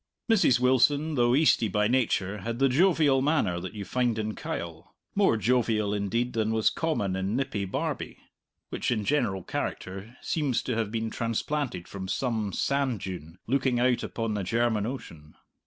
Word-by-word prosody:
Mrs. 160 - +4
Wilson, 140 +5 +3
though 120 -2 +3
Eastie 145 -6 +4
by 105 +1 +1
nature, 105 -5 0
had 115 +3 -4
the 135 +2 +4
jovial 150 -2 +3
manner 135 - +1
that 95 +4 -7
you 100 -1 -5
find 120 -1 0
in 110 0 -2
Kyle; - - -6 0.2
more 195 - +3
jovial, 110 -2 +1
indeed, 110 +5 -1
than 110 -1 0
was 110 -1 +2
common 105 - -1
in 95 +3 -1
nippy 130 -7 -1
Barbie, 95 - -3 0.5
which, - - -2
in 110 -4 0
general 95 -10 0
character, 95 +9 -5
seems 145 -7 -1
to 125 - -2
have 110 -2 -1
been 110 -1 -2
transplanted 120 -2 -2
from 95 -1 -6
some 110 -1 -1
sand 135 -1 0
dune 90 -2 -7
looking 130 -1 +1
out 125 0 +2
upon 115 -2 -3
the 105 - -1
German 110 +1 +1
Ocean. 80 - -8
115 Hz, 165 wpm, -27 LUFS, 105-130 Hz, 0.5 s, Mrs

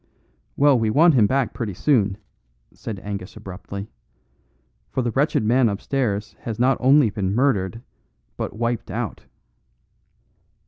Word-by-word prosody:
"Well, 140 -3 +5
we 110 -1 +1
want 160 +8 +5
him 110 -6 +5
back 130 -3 0
pretty 105 -6 -4
soon," 105 - +2 0.6
said 105 -4 -7
Angus 100 -1 -6
abruptly, 100 +2 -8 1.0
"for 130 - -1
the 120 - -1
wretched 140 -1 +1
man 120 +2 +3
upstairs 105 0 -2
has 115 -3 -5
not 130 +3 +3
only 130 -3 +5
been 100 -1 -2
murdered, 115 -4 +1 0.5
but - - -4
wiped 115 0 -2
out." - - -4
115 Hz, 130 wpm, -22 LUFS, 100-130 Hz, 1.0 s, Well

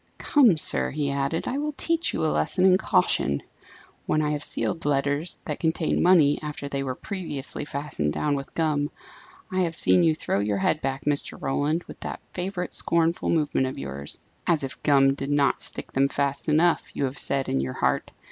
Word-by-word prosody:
"Come, 250 - +4
sir," - - +2
he 145 -1 -2
added, 140 +3 -1
"I 270 - -1
will 300 +1 -2
teach 330 +3 0
you - - -1
a 155 - +1
lesson 185 - +1
in 185 -1 +6
caution. 70 - +1 0.6
When 155 - +1
I 150 - 0
have 150 0 -2
sealed 165 - -1
letters 145 +3 +1
that 150 - -4
contained 160 0 0
money 165 -5 +5
after 150 -2 -5
they 140 -1 -3
were 130 -2 -3
previously 150 -6 -4
fastened 140 - -2
down 150 - -1
with 140 -1 -5
gum, 150 -3 0 0.6
I 185 - -1
have 170 -3 0
seen 180 - +5
you 160 -2 +3
throw 100 - -1
your 100 0 0
head 155 +10 +1
back, 135 0 -3
Mr. 145 -1 -1
Roland, 145 +5 -1
with - - -12
that - - -5
favourite 180 0 -4
scornful 170 0 +1
movement 150 -5 +1
of 130 - -6
yours. 70 +1 -3 0.3
'As 165 -4 +2
if 135 0 -6
gum 135 -2 +4
did 140 0 -5
not 145 -1 +2
stick - - -2
them 135 +1 +2
fast 140 +2 -1
enough!' 165 +3 +2
you - - -1
have 135 +1 -2
said 135 -1 +2
in 65 - 0
your 65 -1 -3
heart. - - -1
145 Hz, 195 wpm, -25 LUFS, 135-165 Hz, 0.6 s, in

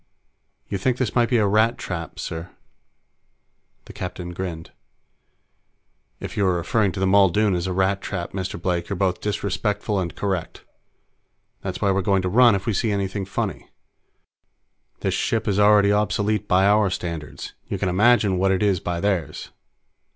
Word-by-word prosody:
"You 100 - -3
think 125 +5 0
this 130 -4 -1
might 120 -2 +2
be 125 - +3
a 110 - +3
Rat 110 +4 +2
trap, 85 -3 -6
sir?" 80 +1 -5 1.4
The - - -12
captain 90 -1 -6
grinned. 85 -3 -6 1.5
"If - - -7
you 100 - +1
are 90 - +2
referring 100 +4 +1
to 100 - -5
the 95 - +1
Muldoon 100 +1 +4
as 90 0 -1
a - - -2
rat 95 +1 +1
trap, 85 - -4
Mr. 95 -2 -4
Blake, 85 -1 -2
you're 100 - -2
both 90 -1 0
disrespectful 105 0 -1
and 85 -2 -4
correct. 95 -4 -3 1.0
That's 95 -1 -5
why 100 - +3
we're 95 +1 +1
going 95 -1 +1
to 90 - 0
run 120 +2 +6
if 95 - -4
we 115 - 0
see 110 +3 0
anything 100 0 -2
funny. 100 - -4 1.3
This - - 0
ship 115 -1 -1
is 100 -1 +1
already 105 -1 +5
obsolete 105 0 0
by 95 0 +3
our 105 0 +4
standards; 85 -4 -6
you - - -3
can - - -1
imagine 100 0 +3
what 95 +1 +2
it 95 +2 +1
is 100 -4 +2
by 85 0 -3
theirs." 100 -5 -2
100 Hz, 170 wpm, -23 LUFS, 90-105 Hz, 1.5 s, run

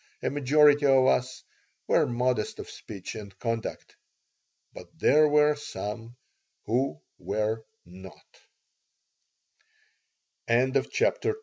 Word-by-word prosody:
A - - 0
majority 145 +1 +4
of 135 -1 +5
us 130 0 0 0.4
were - - +3
modest 120 -2 -1
of - - -8
speech 100 -4 -9
and 100 -3 -10
conduct. 115 -1 -5 0.8
But - - -11
there 150 +1 +4
were 150 0 +4
some 115 -3 -7 0.5
who 120 - -1 0.2
were 110 +1 -2 0.2
not 95 +1 -13 2.3
CHAPTER 130 - +1
III - - +1
WHEN 430 - -12
125 Hz, 105 wpm, -27 LUFS, 110-145 Hz, 2.3 s, of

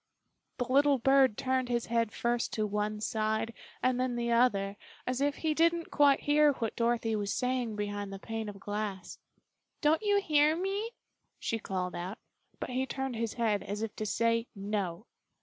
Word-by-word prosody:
The 245 - -1
little 280 +2 +4
bird 265 -2 +4
turned 260 -1 0
his 240 -1 0
head 230 -2 +1
first 235 0 -1
to 215 - 0
one 210 +1 -2
side 220 +1 -1 0.3
and 255 -1 +2
then 255 -1 0
the 235 0 -1
other, 205 -5 +3 0.3
as 255 +1 -1
if 285 0 +2
he 315 -1 0
didn't 335 +1 +2
quite 285 -2 +5
hear 295 0 +4
what 230 -4 -3
Dorothy 230 -1 +1
was 205 -1 -1
saying 250 -3 -1
behind 205 -1 -3
the 195 - -5
pane 225 +1 -4
of 200 -1 -9
glass. 205 -2 -4 0.6
"Don't 315 +3 +3
you 410 -1 +3
hear 305 -4 +3
me?" 390 +5 -2 0.5
she 225 - -2
called 185 -3 -3
out, 185 +5 -5 0.4
but - - -4
he 260 +1 -1
turned 265 -2 -3
his 225 -1 -2
head, 220 -4 +1
as 210 +2 -4
if 225 - -4
to 215 - -2
say, 230 +2 +1
"No!" 200 -2 -3
235 Hz, 180 wpm, -31 LUFS, 210-270 Hz, 0.6 s, quite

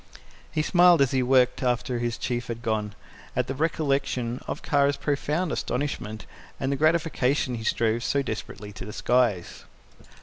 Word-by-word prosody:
He 155 -1 0
smiled, 175 0 +5
as 135 -3 +3
he 130 - +2
worked 125 0 +3
after 125 -1 0
his 120 -1 -2
Chief 120 0 -3
had 115 0 -6
gone, 110 -3 -1 0.4
at 125 - +1
the 135 - -3
recollection 135 -5 -1
of - - -5
Kara's 140 0 +2
profound 150 +4 -1
astonishment 110 -7 -3 0.3
and 135 - -1
the - - +1
gratification 150 -4 +1
he 115 -2 -4
strove 115 0 +1
so 140 +2 +1
desperately 105 -3 -6
to 95 - -8
disguise. 110 -3 0
125 Hz, 155 wpm, -26 LUFS, 115-145 Hz, 0.4 s, smiled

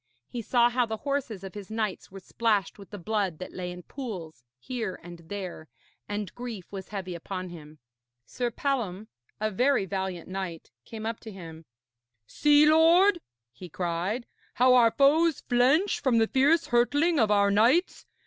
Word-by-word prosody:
He 245 - -5
saw 240 +1 +3
how 245 -1 +1
the 220 0 -3
horses 270 -9 -2
of 195 - -8
his 205 -1 -9
knights 220 -3 -3
were 195 - -10
splashed 210 -2 -1
with 200 - -12
the 205 - -8
blood 200 -3 -2
that 185 - -8
lay 180 -1 -5
in 180 0 -9
pools 175 - -8
here 215 - -5
and 175 -1 -10
there, 185 -5 -6 0.4
and 205 -3 -4
grief 235 -7 -8
was 195 -2 -7
heavy 190 -3 -5
upon 185 +2 -6
him. 155 -3 -12 0.5
Sir 245 -1 -3
Palom, 220 -6 -3 0.3
a 215 0 -1
very 250 +1 +2
valiant 190 -3 -4
knight, 185 -3 -6
came 220 -1 -8
up 225 0 -3
to 220 - -10
him. 165 -4 -10 0.6
'See, 295 - +4
lord,' 340 +4 +5 0.3
he 175 +10 -11
cried, 180 +8 -2 0.3
'how 255 +1 +5
our 240 -2 +6
foes 300 +5 +3
flinch 265 +11 +2
from 255 -4 +2
the 225 - +4
fierce 280 +8 +3
hurtling 290 +7 +2
of 220 -3 +3
our 200 -1 +3
knights. 245 - +2
215 Hz, 170 wpm, -27 LUFS, 185-255 Hz, 0.6 s, our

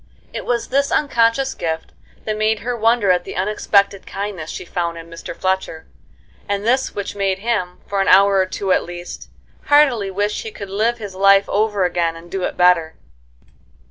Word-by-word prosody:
It - - -5
was 240 -1 -1
this 280 +1 +1
unconscious 265 -1 +2
gift 160 -1 -4 0.3
that 215 - -1
made 215 0 0
her 245 +2 -2
wonder 225 -3 +3
at 180 -1 +1
the - - -8
unexpected 200 0 +1
kindness 195 -5 -5
she - - -6
found 170 -1 -3
in 165 0 -11
Mr. 165 - -8
Fletcher, 185 -4 -2 0.6
and 200 +1 -1
this 255 +3 +1
which 200 0 -4
made 195 -2 0
him, 195 -4 -2
for 200 -1 -1
an - - 0
hour 195 +1 +6
or 190 -1 +2
two 190 +1 -3
at - - +4
least, 175 0 -9 0.4
heartily 270 -9 +4
wish 205 +2 -1
he 220 - -6
could 200 -2 -9
live 225 +4 0
his 205 -4 -7
life 195 +1 +4
over 210 -2 +1
again 170 -2 0
and 165 +1 -13
do 195 - -3
it - - -3
better. 180 -3 +3
200 Hz, 185 wpm, -19 LUFS, 180-220 Hz, 0.6 s, hour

